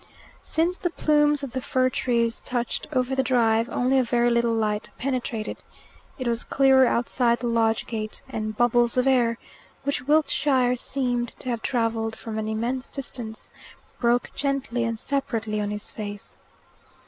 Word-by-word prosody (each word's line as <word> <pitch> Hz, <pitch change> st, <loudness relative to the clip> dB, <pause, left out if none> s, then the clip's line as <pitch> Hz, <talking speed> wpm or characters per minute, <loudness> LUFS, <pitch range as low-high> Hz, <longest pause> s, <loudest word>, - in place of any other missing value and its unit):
Since 340 Hz, +3 st, 0 dB
the 350 Hz, -, -1 dB
plumes 295 Hz, -3 st, +2 dB
of 275 Hz, -, -4 dB
the 260 Hz, -, -3 dB
fir 255 Hz, 0 st, +1 dB
trees 235 Hz, -3 st, 0 dB
touched 245 Hz, -1 st, -2 dB
over 255 Hz, -2 st, 0 dB
the 265 Hz, -, +2 dB
drive, 230 Hz, -3 st, +2 dB
only 260 Hz, +2 st, +2 dB
a -, -, +3 dB
very 240 Hz, 0 st, +2 dB
little 235 Hz, 0 st, +2 dB
light 215 Hz, -2 st, -1 dB
penetrated. 245 Hz, -4 st, -3 dB, 0.6 s
It 255 Hz, -3 st, -3 dB
was 235 Hz, 0 st, +1 dB
clearer 265 Hz, -1 st, +5 dB
outside 235 Hz, 0 st, +1 dB
the 250 Hz, -, -4 dB
lodge 225 Hz, -1 st, +1 dB
gate, 215 Hz, -2 st, -5 dB
and 215 Hz, -4 st, -4 dB
bubbles 240 Hz, 0 st, +3 dB
of 250 Hz, -, +3 dB
air, 240 Hz, -4 st, +3 dB, 0.5 s
which 280 Hz, -3 st, -1 dB
Wiltshire 280 Hz, -4 st, +3 dB
seemed 245 Hz, -2 st, -1 dB
to 255 Hz, -, -6 dB
have 235 Hz, -2 st, -2 dB
travelled 225 Hz, -2 st, -1 dB
from 220 Hz, -1 st, -5 dB
an 215 Hz, -, -3 dB
immense 235 Hz, +4 st, -2 dB
distance, 235 Hz, -5 st, -7 dB, 0.5 s
broke 240 Hz, 0 st, +2 dB
gently 270 Hz, -4 st, -1 dB
and 230 Hz, -1 st, -2 dB
separately 225 Hz, -5 st, -2 dB
on 205 Hz, -, -2 dB
his 210 Hz, 0 st, -5 dB
face. 205 Hz, -2 st, -7 dB
240 Hz, 160 wpm, -25 LUFS, 225-265 Hz, 0.6 s, clearer